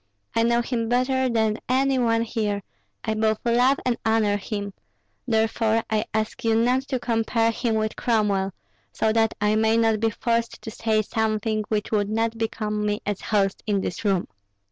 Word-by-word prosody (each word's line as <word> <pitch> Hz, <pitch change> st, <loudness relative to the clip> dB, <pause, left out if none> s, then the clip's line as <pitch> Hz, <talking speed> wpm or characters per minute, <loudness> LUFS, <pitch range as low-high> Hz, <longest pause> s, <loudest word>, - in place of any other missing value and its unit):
I 230 Hz, -, +3 dB
know 235 Hz, +1 st, +2 dB
him 230 Hz, -2 st, -2 dB
better 255 Hz, +1 st, +2 dB
than 220 Hz, -2 st, +1 dB
any 265 Hz, +1 st, +2 dB
one 230 Hz, -1 st, +2 dB
here; 210 Hz, -3 st, -2 dB, 0.4 s
I 220 Hz, -, -1 dB
both 220 Hz, 0 st, +1 dB
love 245 Hz, +3 st, +3 dB
and 245 Hz, -2 st, +1 dB
honor 220 Hz, -2 st, +2 dB
him; 205 Hz, 0 st, -4 dB, 0.5 s
therefore 225 Hz, 0 st, +1 dB
I 215 Hz, 0 st, +1 dB
ask 220 Hz, 0 st, -2 dB
you 225 Hz, -1 st, +2 dB
not 245 Hz, +3 st, +3 dB
to 265 Hz, -, -1 dB
compare 230 Hz, -1 st, +1 dB
him 230 Hz, 0 st, -1 dB
with 215 Hz, 0 st, -1 dB
Cromwell, 205 Hz, -5 st, +1 dB, 0.4 s
so 220 Hz, 0 st, +1 dB
that 225 Hz, -1 st, +2 dB
I 210 Hz, +1 st, +2 dB
may 220 Hz, +1 st, +3 dB
not 225 Hz, -2 st, +2 dB
be 225 Hz, +1 st, +2 dB
forced 230 Hz, +1 st, -1 dB
to 220 Hz, -, -6 dB
say 220 Hz, -1 st, 0 dB
something 215 Hz, 0 st, -1 dB
which 210 Hz, -1 st, -2 dB
would 205 Hz, -2 st, +1 dB
not 225 Hz, +1 st, -1 dB
become 215 Hz, -1 st, -2 dB
me 210 Hz, 0 st, -1 dB
as 205 Hz, -2 st, -2 dB
host 195 Hz, -3 st, 0 dB
in 200 Hz, -2 st, +1 dB
this 180 Hz, -, -4 dB
room." 195 Hz, -4 st, +1 dB
220 Hz, 180 wpm, -24 LUFS, 215-230 Hz, 0.5 s, I